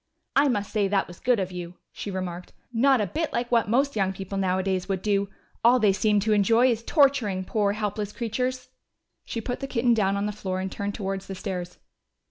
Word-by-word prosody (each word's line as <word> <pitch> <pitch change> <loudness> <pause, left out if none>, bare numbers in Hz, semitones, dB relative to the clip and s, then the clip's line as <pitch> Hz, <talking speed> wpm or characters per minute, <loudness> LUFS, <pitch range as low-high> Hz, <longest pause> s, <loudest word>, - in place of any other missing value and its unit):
"I 280 +1 +5
must 205 -6 -1
say 205 -3 +2
that 195 0 +1
was 175 - -12
good 245 -3 +2
of 185 -1 -2
you," 175 -1 -7 0.2
she - - -6
remarked. 180 -2 -5 0.2
"Not 265 +2 +4
a - - +1
bit 310 - -2
like 240 0 -2
what 230 -3 +3
most 275 +5 +2
young 190 -2 +1
people 195 +1 -6
nowadays 190 0 0
would 190 -1 -1
do! 200 -1 +1 0.3
All 240 +2 +6
they 210 -4 +4
seem 210 +1 +2
to 215 +1 +2
enjoy 230 +5 +4
is 230 -1 -1
torturing 255 - +2
poor 205 0 +1
helpless 210 -1 -3
creatures!" 250 +3 -3 0.6
She 230 - -4
put 245 +2 -4
the 275 - -4
kitten 240 -2 +2
down 200 -3 +1
on 200 - -1
the 210 - -1
floor 190 -3 -4
and 190 0 -3
turned 200 0 -3
towards 195 -1 -4
the 195 - -5
stairs. 185 -2 -5
205 Hz, 215 wpm, -26 LUFS, 190-235 Hz, 0.6 s, All